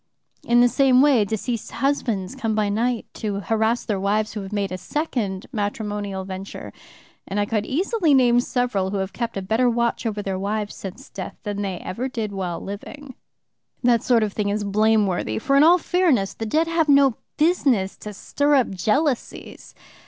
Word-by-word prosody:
In 240 Hz, 0 st, +4 dB
the 245 Hz, -, +6 dB
same 260 Hz, +1 st, +4 dB
way 270 Hz, -7 st, +5 dB
deceased 220 Hz, +2 st, -4 dB
husbands 235 Hz, -8 st, -1 dB
come 225 Hz, -5 st, -2 dB
by 210 Hz, -1 st, +1 dB
night 230 Hz, +3 st, 0 dB
to 205 Hz, -2 st, -3 dB
harass 225 Hz, +4 st, 0 dB
their 205 Hz, -4 st, -1 dB
wives 210 Hz, +2 st, 0 dB
who 215 Hz, -, -4 dB
have 195 Hz, 0 st, -8 dB
made 200 Hz, -2 st, -2 dB
a 185 Hz, -, -3 dB
second 220 Hz, -, -3 dB
matrimonial 205 Hz, -3 st, -3 dB
venture, 190 Hz, +1 st, -8 dB, 0.5 s
and 200 Hz, -, -2 dB
I 205 Hz, -, +2 dB
could 210 Hz, 0 st, -2 dB
easily 345 Hz, -, +2 dB
name 245 Hz, -2 st, +5 dB
several 245 Hz, -6 st, 0 dB
who 200 Hz, -, -2 dB
have 190 Hz, 0 st, -3 dB
kept 235 Hz, -3 st, -3 dB
a 195 Hz, -, -3 dB
better 225 Hz, +6 st, +2 dB
watch 235 Hz, 0 st, 0 dB
over 210 Hz, -2 st, -3 dB
their 190 Hz, -1 st, -3 dB
wives 205 Hz, +1 st, -2 dB
since 190 Hz, -2 st, -9 dB
death 190 Hz, -, -7 dB
than 205 Hz, -1 st, -3 dB
they 195 Hz, -3 st, -3 dB
ever 240 Hz, +8 st, -4 dB
did 225 Hz, -5 st, -4 dB
while 185 Hz, -4 st, -3 dB
living. 260 Hz, +8 st, -8 dB, 0.7 s
"That 240 Hz, -2 st, +4 dB
sort 235 Hz, -3 st, +3 dB
of 210 Hz, -2 st, -2 dB
thing 205 Hz, -2 st, -1 dB
is 205 Hz, +1 st, -1 dB
blameworthy, 210 Hz, -2 st, +1 dB
for 275 Hz, +5 st, +1 dB
in 280 Hz, -, +6 dB
all 335 Hz, +4 st, +7 dB
fairness 330 Hz, -, +1 dB
the 225 Hz, -, -5 dB
dead 315 Hz, +9 st, +2 dB
have 330 Hz, -2 st, 0 dB
no 275 Hz, -4 st, +5 dB, 0.2 s
business 275 Hz, -, +2 dB
to 210 Hz, -, -8 dB
stir 285 Hz, +8 st, 0 dB
up 260 Hz, -6 st, +2 dB
jealousies. 250 Hz, -, -2 dB
220 Hz, 185 wpm, -23 LUFS, 200-260 Hz, 0.7 s, all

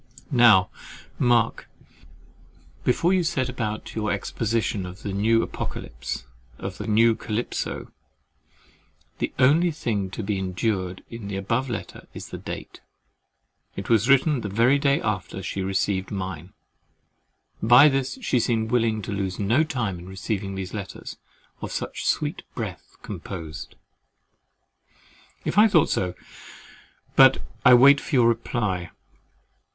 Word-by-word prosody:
Now 115 Hz, -7 st, +6 dB, 0.5 s
mark, 120 Hz, -2 st, +2 dB, 1.1 s
before 170 Hz, +8 st, +2 dB
you 185 Hz, -2 st, +2 dB
set 130 Hz, -5 st, -1 dB
about 110 Hz, -4 st, -4 dB
your 105 Hz, -1 st, -1 dB
exposition 110 Hz, 0 st, -1 dB
of 90 Hz, +1 st, -9 dB
the 100 Hz, -, -3 dB
new 115 Hz, +3 st, +3 dB
Apocalypse -, -, -5 dB, 0.3 s
of 95 Hz, +1 st, -6 dB
the 105 Hz, -, -5 dB
new 115 Hz, +2 st, +4 dB
Calypso, 110 Hz, +1 st, -4 dB, 1.3 s
the -, -, -1 dB
only 150 Hz, +7 st, +4 dB
thing 105 Hz, -, -2 dB
to 105 Hz, -, -6 dB
be 100 Hz, -1 st, -1 dB
endured 95 Hz, 0 st, -2 dB
in 115 Hz, -3 st, -7 dB
the 100 Hz, -, -4 dB
above 115 Hz, +7 st, -1 dB
letter 115 Hz, -, -6 dB
is -, -, -8 dB
the -, -, -7 dB
date. -, -, -8 dB, 0.9 s
It 100 Hz, -, -6 dB
was 115 Hz, +1 st, +3 dB
written 140 Hz, 0 st, +4 dB
the 105 Hz, -, -4 dB
very 120 Hz, +8 st, +3 dB
day 140 Hz, -1 st, +2 dB
after 95 Hz, -2 st, -3 dB
she 95 Hz, -, -3 dB
received 95 Hz, 0 st, -1 dB
mine. 95 Hz, -3 st, -5 dB, 1.1 s
By 120 Hz, +6 st, +8 dB
this 135 Hz, -, 0 dB
she 130 Hz, -, +2 dB
seems 110 Hz, -1 st, 0 dB
willing 115 Hz, -3 st, +1 dB
to -, -, -5 dB
lose 95 Hz, -2 st, -2 dB
no 115 Hz, +9 st, +2 dB
time 115 Hz, -, -3 dB
in 90 Hz, +2 st, -11 dB
receiving 95 Hz, 0 st, -4 dB
these 95 Hz, -1 st, -5 dB
letters 100 Hz, -3 st, -7 dB, 0.4 s
"of -, -, -5 dB
such -, -, -4 dB
sweet -, -, 0 dB
breath -, -, -6 dB
composed." 80 Hz, -4 st, -7 dB, 1.7 s
If 205 Hz, -, +2 dB
I 220 Hz, -, +8 dB
thought 175 Hz, -8 st, +3 dB
so—but 90 Hz, -1 st, 0 dB, 0.2 s
I 125 Hz, -, +8 dB
wait 140 Hz, +3 st, +7 dB
for 150 Hz, -, -3 dB
your 120 Hz, -2 st, +5 dB
reply. 110 Hz, -6 st, -1 dB
110 Hz, 135 wpm, -24 LUFS, 95-125 Hz, 1.7 s, By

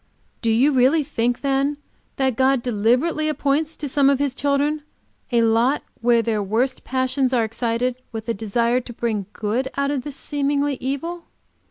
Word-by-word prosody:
"Do 230 Hz, -, 0 dB
you 245 Hz, +7 st, +4 dB
really 270 Hz, +4 st, +4 dB
think, 245 Hz, -4 st, -1 dB
then, 275 Hz, +1 st, +1 dB, 0.4 s
that 265 Hz, -3 st, +1 dB
God 260 Hz, 0 st, +2 dB
deliberately 250 Hz, +8 st, +1 dB
appoints 305 Hz, +1 st, 0 dB
to 295 Hz, -, -5 dB
some 275 Hz, 0 st, +3 dB
of 280 Hz, -, +3 dB
His 280 Hz, -1 st, 0 dB
children 285 Hz, +2 st, 0 dB, 0.5 s
a 235 Hz, -1 st, +3 dB
lot 230 Hz, +5 st, +2 dB, 0.2 s
where 235 Hz, -1 st, +3 dB
their 220 Hz, -2 st, 0 dB
worst 225 Hz, +7 st, -1 dB
passions 260 Hz, 0 st, 0 dB
are 240 Hz, -2 st, +3 dB
excited, 235 Hz, +2 st, -1 dB, 0.2 s
with 225 Hz, -1 st, -6 dB
a 230 Hz, -, +1 dB
desire 235 Hz, +4 st, 0 dB
to 240 Hz, -, -10 dB
bring 220 Hz, -4 st, -2 dB
good 230 Hz, +5 st, -2 dB
out 280 Hz, 0 st, +1 dB
of 280 Hz, -3 st, -1 dB
this 290 Hz, 0 st, -7 dB
seeming 285 Hz, 0 st, -1 dB
evil? 330 Hz, +7 st, -4 dB
260 Hz, 170 wpm, -22 LUFS, 230-280 Hz, 0.5 s, you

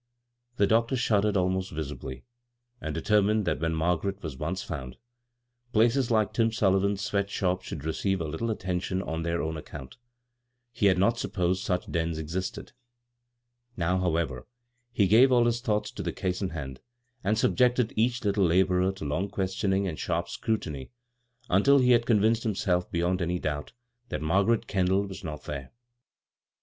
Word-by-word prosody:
The 100 Hz, -, +4 dB
doctor 115 Hz, +5 st, +2 dB
shuddered 105 Hz, -4 st, +2 dB
abnost 95 Hz, +1 st, 0 dB
vi«biy, 70 Hz, -4 st, -6 dB, 0.6 s
and -, -, -4 dB
determined 105 Hz, 0 st, +2 dB
that -, -, 0 dB
when 80 Hz, 0 st, 0 dB
Margaret 90 Hz, +4 st, -1 dB
was 80 Hz, -5 st, -5 dB
once 85 Hz, +8 st, -3 dB
found, 65 Hz, -6 st, -6 dB, 0.8 s
places 115 Hz, +3 st, +3 dB
like 110 Hz, -3 st, +2 dB
Tim 115 Hz, -1 st, +2 dB
Sullivan's 100 Hz, -1 st, +1 dB
sweat 100 Hz, -1 st, -1 dB
shop 95 Hz, -2 st, 0 dB
should 75 Hz, -5 st, -7 dB
receive 95 Hz, +4 st, 0 dB
a -, -, -2 dB
little 80 Hz, +10 st, -3 dB
attention 95 Hz, -2 st, -2 dB
on 80 Hz, +1 st, -3 dB
their 85 Hz, +1 st, -1 dB
own 80 Hz, +1 st, -3 dB
account—he 120 Hz, -, -7 dB
had 95 Hz, -1 st, +4 dB
not 115 Hz, +5 st, +2 dB
supposed 90 Hz, 0 st, -1 dB
such 90 Hz, -2 st, -2 dB
dens 80 Hz, -1 st, -1 dB
existed. 85 Hz, +4 st, -4 dB, 1.1 s
Now, 90 Hz, +1 st, +1 dB
however, 80 Hz, -8 st, -1 dB, 0.4 s
he 105 Hz, -4 st, +3 dB
gave 115 Hz, +7 st, +6 dB
all 120 Hz, -2 st, +5 dB
his 120 Hz, 0 st, +1 dB
thoughts 105 Hz, -2 st, -1 dB
to -, -, -6 dB
the -, -, -2 dB
case 90 Hz, 0 st, -3 dB
in 95 Hz, -, -1 dB
hand, 70 Hz, -6 st, -6 dB, 0.4 s
and 105 Hz, +3 st, +1 dB
subjected 125 Hz, 0 st, +2 dB
each 120 Hz, +3 st, +1 dB
little 100 Hz, -1 st, +2 dB
laborer 90 Hz, +2 st, +3 dB
to 95 Hz, -5 st, -7 dB
long 90 Hz, +8 st, -1 dB
questioning 95 Hz, +1 st, 0 dB
and 80 Hz, -4 st, -5 dB
sharp 85 Hz, 0 st, -1 dB
scrutiny 80 Hz, -9 st, -3 dB, 0.6 s
until 120 Hz, +10 st, +5 dB
he 125 Hz, -2 st, +4 dB
had 120 Hz, -1 st, +4 dB
convinced 110 Hz, 0 st, +3 dB
himself 95 Hz, -5 st, 0 dB
beyond 90 Hz, +2 st, 0 dB
any 90 Hz, +1 st, 0 dB
doubt 75 Hz, -4 st, -4 dB, 0.4 s
that -, -, -3 dB
Margaret 100 Hz, +8 st, +2 dB
Kendall 95 Hz, -1 st, +1 dB
was 95 Hz, 0 st, -8 dB
not 75 Hz, -3 st, -6 dB
there. 70 Hz, -3 st, -6 dB
95 Hz, 160 wpm, -28 LUFS, 85-110 Hz, 1.1 s, gave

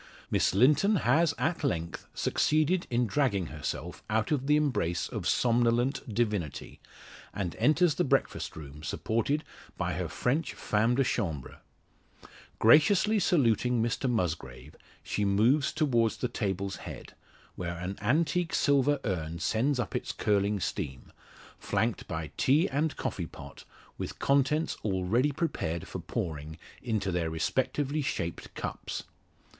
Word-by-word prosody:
Miss -, -, +2 dB
Linton 150 Hz, -, +5 dB
has 160 Hz, +6 st, +3 dB
at 160 Hz, +1 st, -1 dB
length 85 Hz, -, -2 dB
succeeded 155 Hz, +4 st, +1 dB
in 120 Hz, 0 st, +2 dB
dragging 110 Hz, -6 st, +1 dB
herself 75 Hz, -1 st, -5 dB
out 110 Hz, +3 st, 0 dB
of 140 Hz, -3 st, 0 dB
the 150 Hz, -, +5 dB
embrace 130 Hz, -, 0 dB
of -, -, -4 dB
the -, -, -3 dB
somnolent 120 Hz, +2 st, +2 dB
divinity, 105 Hz, -, -2 dB, 0.6 s
and 95 Hz, -4 st, -3 dB
enters 155 Hz, +7 st, +4 dB
the -, -, +1 dB
breakfast -, -, 0 dB
room, 75 Hz, -1 st, -9 dB
supported 115 Hz, -, -1 dB, 0.3 s
by -, -, -1 dB
her -, -, -2 dB
French 145 Hz, +6 st, -1 dB
femme 115 Hz, +3 st, +1 dB
de 135 Hz, -, +3 dB
chambre. 85 Hz, -, -3 dB, 1.0 s
Graciously 190 Hz, -, +5 dB
saluting 125 Hz, -, +2 dB
Mr 120 Hz, +3 st, -1 dB
Musgrave, 80 Hz, -, -3 dB, 0.3 s
she 105 Hz, -, -2 dB
moves 110 Hz, +9 st, +3 dB
towards 125 Hz, -8 st, +1 dB
the 125 Hz, -, -1 dB
table's 100 Hz, -4 st, -2 dB
head, -, -, -9 dB, 0.4 s
where 85 Hz, -1 st, -4 dB
an 90 Hz, +3 st, -4 dB
antique 160 Hz, +8 st, +1 dB
silver 145 Hz, 0 st, +3 dB
urn 85 Hz, -5 st, -2 dB
sends 125 Hz, -, +1 dB
up 120 Hz, -, -2 dB
its -, -, -2 dB
curling 100 Hz, 0 st, +1 dB
steam 65 Hz, -7 st, -4 dB, 0.5 s
flanked -, -, -1 dB
by 80 Hz, -2 st, -4 dB
tea 150 Hz, +7 st, +4 dB
and 145 Hz, +2 st, -1 dB
coffee 85 Hz, -4 st, -3 dB
pot, 70 Hz, -3 st, -12 dB, 0.3 s
with -, -, -5 dB
contents 140 Hz, +3 st, +2 dB
already 105 Hz, +8 st, +1 dB
prepared 85 Hz, -, -2 dB
for -, -, -6 dB
pouring 80 Hz, 0 st, -4 dB, 0.2 s
into 105 Hz, -6 st, -1 dB
their 85 Hz, -2 st, 0 dB
respectively 130 Hz, -, -1 dB
shaped 85 Hz, -, -3 dB
cups. -, -, -5 dB
115 Hz, 135 wpm, -29 LUFS, 90-145 Hz, 1.0 s, Linton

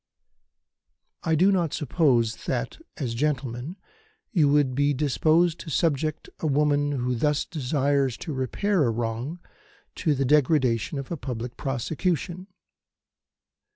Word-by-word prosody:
"I 160 Hz, -, +1 dB
do 185 Hz, +6 st, +4 dB
not 170 Hz, -5 st, +1 dB
suppose 130 Hz, -7 st, +1 dB
that, -, -, -2 dB, 0.2 s
as 120 Hz, -4 st, -2 dB
gentlemen, 130 Hz, +2 st, -2 dB, 0.6 s
you 160 Hz, -, +3 dB
would 145 Hz, -3 st, +3 dB
be 145 Hz, +2 st, +2 dB
disposed 155 Hz, +4 st, +2 dB
to -, -, -8 dB
subject 155 Hz, 0 st, 0 dB
a 160 Hz, -, -1 dB
woman 145 Hz, 0 st, +2 dB
who 125 Hz, -2 st, -1 dB
thus 150 Hz, +5 st, +1 dB
desires 140 Hz, -3 st, 0 dB
to 160 Hz, -, -3 dB
repair 150 Hz, -, 0 dB
a -, -, +2 dB
wrong 115 Hz, +7 st, -3 dB, 0.6 s
to 155 Hz, -5 st, +1 dB
the 135 Hz, 0 st, 0 dB
degradation 135 Hz, -3 st, +2 dB
of 140 Hz, +2 st, -6 dB
a 170 Hz, -, -2 dB
public 120 Hz, -3 st, -5 dB
prosecution. 165 Hz, +7 st, -2 dB
145 Hz, 125 wpm, -26 LUFS, 125-160 Hz, 0.6 s, do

